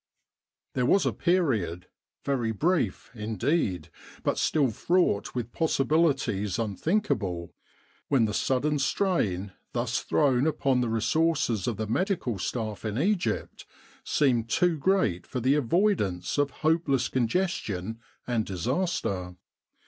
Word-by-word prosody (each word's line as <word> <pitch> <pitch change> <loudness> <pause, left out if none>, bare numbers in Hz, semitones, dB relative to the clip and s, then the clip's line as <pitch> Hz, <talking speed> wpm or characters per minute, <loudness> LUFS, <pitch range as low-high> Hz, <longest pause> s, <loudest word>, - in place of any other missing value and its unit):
There 125 -1 +1
was 195 - +4
a - - +1
period 115 - 0 0.4
very 125 -5 0
brief, 150 - 0
indeed, 105 - -1 0.3
but - - 0
still 140 -6 +2
fraught 170 - +1
with 120 -1 -3
possibilities 140 - +1
unthinkable 105 - -1 0.5
when 130 -5 +3
the 105 - -2
sudden 140 +5 +1
strain 115 - 0 0.2
thus 120 +1 0
thrown 135 -1 +2
upon 135 -4 +1
the 120 - 0
resources 115 - +1
of 115 -4 -1
the 110 - -2
Medical 125 - -1
Staff 110 0 -3
in 110 0 -3
Egypt 170 - -1 0.4
seemed 120 -6 +1
too 175 +7 +2
great 150 - +1
for 125 - -3
the 130 +3 +3
avoidance 145 - +1
of 145 -1 +2 0.2
hopeless 150 -6 +2
congestion 115 - -1 0.3
and 120 -3 0
disaster. 95 - -2
125 Hz, 120 wpm, -27 LUFS, 105-160 Hz, 0.5 s, was